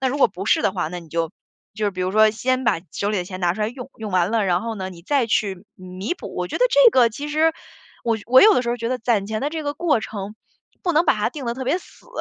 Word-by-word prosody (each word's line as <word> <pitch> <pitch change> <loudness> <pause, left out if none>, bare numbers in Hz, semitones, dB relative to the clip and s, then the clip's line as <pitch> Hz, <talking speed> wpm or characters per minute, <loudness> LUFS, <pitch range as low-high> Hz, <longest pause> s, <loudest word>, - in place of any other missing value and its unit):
那 265 - +1
如 280 +3 -2
果 - - +6
不 185 +3 -8
是 - - +3
的 - - +1
话， 175 -5 -2
那 180 +2 -6
你 170 -2 -13
就 165 0 -2 0.4
就 215 -1 -3
是 200 - 0
比 185 - -6
如 185 0 0
说 215 +2 +5
先 255 +4 -1
把 225 - +2
手 205 - -2
里 210 - 0
的 180 - -2
钱 185 0 -7
拿 175 -1 +1
出 215 - -7
来 210 - +1
用， 250 +2 -9
用 220 -2 -6
完 185 +2 +1
了， 225 -3 +2
然 180 -2 +1
后 225 +1 -4
呢， 190 -2 -5
你 170 -2 -13
再 270 +3 +1
去 200 -3 -1
弥 185 - -5
补。 - - -9
我 - - -3
觉 - - -4
得 - - +4
这 - - +6
个 245 - +5
其 285 +7 -6
实， 315 +2 +2 0.5
我 230 -1 +1
我 255 +3 +7
有 430 0 +7
的 250 - +2
时 235 - -4
候 240 - -1
觉 230 -1 -3
得 255 0 -1
攒 225 -4 0
钱 215 +1 -3
的 285 - -1
这 315 -1 -4
个 290 0 -3
过 320 -9 +1
程， 210 -1 -6 0.5
不 350 - 0
能 320 +3 +4
把 310 - +4
它 210 +1 0
定 285 -2 -7
得 235 - -1
特 260 +1 -5
别 265 - +1
死。 - - -19
220 Hz, 330 characters per minute, -22 LUFS, 190-260 Hz, 0.5 s, 我